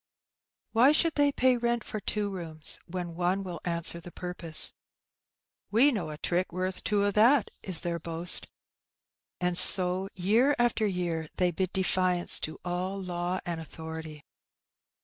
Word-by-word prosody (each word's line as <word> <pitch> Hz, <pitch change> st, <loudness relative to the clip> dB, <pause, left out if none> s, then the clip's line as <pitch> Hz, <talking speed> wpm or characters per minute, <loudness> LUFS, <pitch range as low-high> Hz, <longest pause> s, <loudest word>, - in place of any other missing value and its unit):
Why 250 Hz, +6 st, +5 dB
should 325 Hz, +1 st, +3 dB
they 285 Hz, -1 st, +2 dB
pay 255 Hz, -2 st, +2 dB
rent 235 Hz, -1 st, -1 dB
for 215 Hz, -, -6 dB
two 205 Hz, 0 st, -2 dB
rooms 160 Hz, -4 st, -3 dB
when 175 Hz, -1 st, -5 dB
one 180 Hz, +3 st, -1 dB
will 180 Hz, -3 st, -7 dB
answer 170 Hz, -1 st, +1 dB
the 175 Hz, +1 st, -12 dB
purpose? 175 Hz, -3 st, -1 dB, 1.0 s
^'We 255 Hz, +7 st, +4 dB
know 180 Hz, -8 st, -3 dB
a 150 Hz, -, -7 dB
trick 180 Hz, +4 st, -1 dB
worth 185 Hz, +1 st, -3 dB
two 205 Hz, -2 st, +1 dB
o* 205 Hz, -, +1 dB
that,'^ 230 Hz, +5 st, +4 dB
is 185 Hz, -4 st, -2 dB
their 170 Hz, -1 st, -3 dB
boast. 165 Hz, +2 st, +2 dB, 0.9 s
And 180 Hz, 0 st, -1 dB
so 185 Hz, +1 st, +5 dB
year 225 Hz, +10 st, +2 dB
by 240 Hz, 0 st, +3 dB
year 175 Hz, -5 st, -3 dB
they 180 Hz, -1 st, +1 dB
bid 185 Hz, +2 st, -2 dB
defiance 185 Hz, -2 st, +2 dB
to 155 Hz, -, -3 dB
all 180 Hz, +2 st, -3 dB
law 180 Hz, 0 st, -3 dB
and 170 Hz, -2 st, -4 dB
authority. 160 Hz, -1 st, -9 dB
180 Hz, 150 wpm, -28 LUFS, 170-205 Hz, 1.0 s, Why